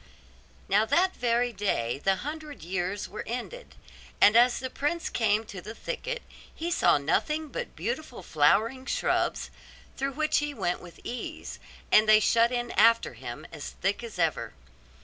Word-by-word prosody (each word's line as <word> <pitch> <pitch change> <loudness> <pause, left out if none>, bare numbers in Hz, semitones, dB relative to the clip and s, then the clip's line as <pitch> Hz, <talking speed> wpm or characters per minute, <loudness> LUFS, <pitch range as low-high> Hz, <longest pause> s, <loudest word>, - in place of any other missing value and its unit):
Now 205 +2 +4
that 365 +10 +2
very 240 0 +1
day 140 - -1
the 195 0 +3
hundred 305 -1 -7
years 185 +3 -2
were 215 - -7
ended; 250 - -6 0.4
and 210 - +6
as 240 +1 +6
the 260 0 -5
prince 330 +4 -2
came 220 -1 +1
to 195 -4 -8
the 215 +5 -8
thicket - - -4 0.3
he 335 +2 -4
saw 335 - +4
nothing 300 - 0
but 485 +9 -6
beautiful 310 - -4
flowering 220 - +2
shrubs, - - 0 0.5
through 275 +1 -2
which 310 +2 +1
he 295 -1 -3
went 180 -4 -1
with 175 -1 -13
ease, 245 - -6 0.3
and 215 0 +6
they 215 0 +8
shut 230 +2 +3
in 240 -1 -2
after 230 +2 +4
him - - -8
as - - -8
thick - - -1
as 470 - -8
ever. - - -1
235 Hz, 160 wpm, -28 LUFS, 205-295 Hz, 0.5 s, they